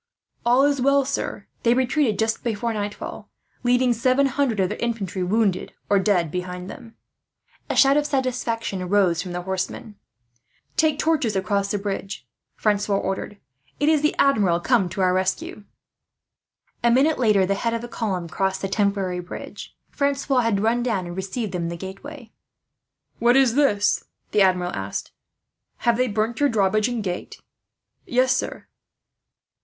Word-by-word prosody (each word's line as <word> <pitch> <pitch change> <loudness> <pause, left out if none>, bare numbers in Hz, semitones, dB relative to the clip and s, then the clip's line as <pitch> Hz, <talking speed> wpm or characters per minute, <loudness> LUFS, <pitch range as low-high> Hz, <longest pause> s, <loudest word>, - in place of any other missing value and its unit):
"All 245 +3 +4
is 285 -2 +2
well, 275 +1 +3
sir. 280 - -3 0.2
They 235 0 +3
retreated 260 -3 +1
just 220 0 -1
before 230 0 -1
nightfall, 205 -1 -5 0.3
leaving 245 0 +3
seven 255 +4 +2
hundred 270 -5 0
of 185 -1 +2
their - - -4
infantry 205 -6 -2
wounded 195 0 0 0.2
or 200 - +5
dead 185 -5 +1
behind 180 0 -5
them." 225 -1 -12 0.7
A - - -1
shout 275 +1 +5
of 295 0 +1
satisfaction 235 -8 -2
rose 185 -4 +3
from 180 - -6
the 175 0 -4
horsemen. 190 +3 -4 0.8
"Take 315 -4 +2
torches 305 -9 +1
across 200 +1 0
the 205 - 0
bridge," 195 -7 -5 0.3
Francois 205 -1 +1
ordered. 195 +1 -3 0.4
"It 290 - +3
is 310 -2 +3
the 300 - +1
Admiral, 205 -11 +3
come 200 -1 +2
to 195 - -4
our 185 -1 +3
rescue." 190 +2 -2 1.2
A 235 - +5
minute 275 +6 +3
later, 210 -6 +4
the 200 - +1
head 230 +3 -1
of 230 - -4
the - - -5
column 195 -7 -3
crossed 190 +3 -2
the - - 0
temporary 195 -3 0
bridge. 180 0 -9
Francois 280 -1 +1
had 225 -5 +1
run 230 +3 +2
down 220 -7 -1
and 175 0 -7
received 195 +3 -3
them 175 -2 -2
in - - -2
the 170 - -5
gateway. 225 - -9 0.9
"What 240 +2 +4
is 265 -4 +4
this?" 235 -8 +2 0.3
the 210 - +3
Admiral 180 -2 +2
asked. 95 0 -4 0.7
"Have 235 -1 +3
they 255 +1 +2
burnt 220 +2 -1
your 290 -1 +3
drawbridge 215 0 +2
and 240 -3 -3
gate?" 180 -2 -5 0.7
"Yes, 255 +1 +3
sir." - - -4
215 Hz, 160 wpm, -23 LUFS, 190-250 Hz, 1.2 s, or